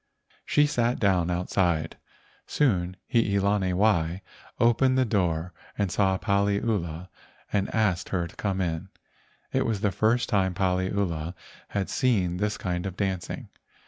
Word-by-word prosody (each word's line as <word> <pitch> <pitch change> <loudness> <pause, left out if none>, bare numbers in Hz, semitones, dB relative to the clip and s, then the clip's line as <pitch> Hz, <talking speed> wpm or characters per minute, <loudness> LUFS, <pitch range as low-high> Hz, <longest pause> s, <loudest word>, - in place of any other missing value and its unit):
She 150 - +4
sat 120 -4 0
down 90 -4 +2
outside. 85 -2 0 0.5
Soon 90 -10 +1 0.2
Hii 105 -4 +3
lani 100 -1 +1
wai 90 -3 +1 0.4
opened 130 +3 +4
the 130 - +3
door 90 -5 0 0.2
and 100 -3 0
saw 95 -2 +2
Paliula 100 -4 0 0.5
and 100 -1 0
asked 100 -5 +1
her 90 -3 0
to 85 - -12
come 95 -2 -1
in. 85 +2 -2 0.6
It - - +2
was 110 -4 -1
the 105 -2 +2
first 115 +4 +2
time 95 -5 +1
Paliula 95 -3 -1 0.3
had 100 -2 -2
seen 95 -9 +1
this 105 +2 -1
kind 90 0 -2
of 95 -1 -7
dancing. 95 -3 -3
95 Hz, 140 wpm, -26 LUFS, 90-105 Hz, 0.6 s, She